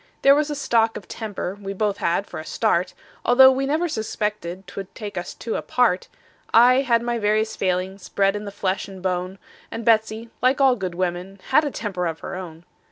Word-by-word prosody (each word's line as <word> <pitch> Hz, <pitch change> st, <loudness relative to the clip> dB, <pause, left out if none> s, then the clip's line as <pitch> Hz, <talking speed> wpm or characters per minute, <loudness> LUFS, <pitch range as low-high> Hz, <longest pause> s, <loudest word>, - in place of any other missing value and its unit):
There 275 Hz, -, +8 dB
was 300 Hz, +1 st, +1 dB
a 295 Hz, -, -2 dB
stock 230 Hz, -5 st, +1 dB
of 185 Hz, -, -11 dB
temper 205 Hz, -4 st, -5 dB
we 195 Hz, 0 st, -4 dB
both 205 Hz, 0 st, -1 dB
had 175 Hz, +4 st, 0 dB
for -, -, -8 dB
a -, -, -6 dB
start, 185 Hz, -2 st, 0 dB, 0.3 s
Although 265 Hz, +2 st, +7 dB
we 270 Hz, +1 st, -1 dB
never 315 Hz, +5 st, +1 dB
suspected 210 Hz, -, -3 dB
'twould 195 Hz, +1 st, -8 dB
take 205 Hz, -2 st, -7 dB
us 175 Hz, -1 st, -5 dB
two 225 Hz, -, -4 dB
apart; 235 Hz, -7 st, +1 dB, 0.4 s
I 250 Hz, +3 st, +6 dB
had 235 Hz, -3 st, +2 dB
my 240 Hz, -1 st, -1 dB
various 215 Hz, +1 st, +1 dB
failings, 185 Hz, +1 st, -2 dB
bred 195 Hz, 0 st, +2 dB
in 205 Hz, 0 st, -5 dB
the 200 Hz, -, -6 dB
flesh 195 Hz, -1 st, -2 dB
and 190 Hz, -2 st, -11 dB
bone; 185 Hz, +1 st, -2 dB, 0.3 s
And 230 Hz, -, -6 dB
Betsey, 220 Hz, 0 st, +2 dB
like 255 Hz, +2 st, +3 dB
all 265 Hz, -2 st, +5 dB
good 185 Hz, -6 st, -4 dB
women, 180 Hz, +2 st, -3 dB
had 285 Hz, +4 st, +5 dB
a -, -, 0 dB
temper 195 Hz, -9 st, -3 dB
of 160 Hz, -1 st, -5 dB
her -, -, -6 dB
own. 175 Hz, -3 st, -8 dB
210 Hz, 205 wpm, -23 LUFS, 185-235 Hz, 0.4 s, There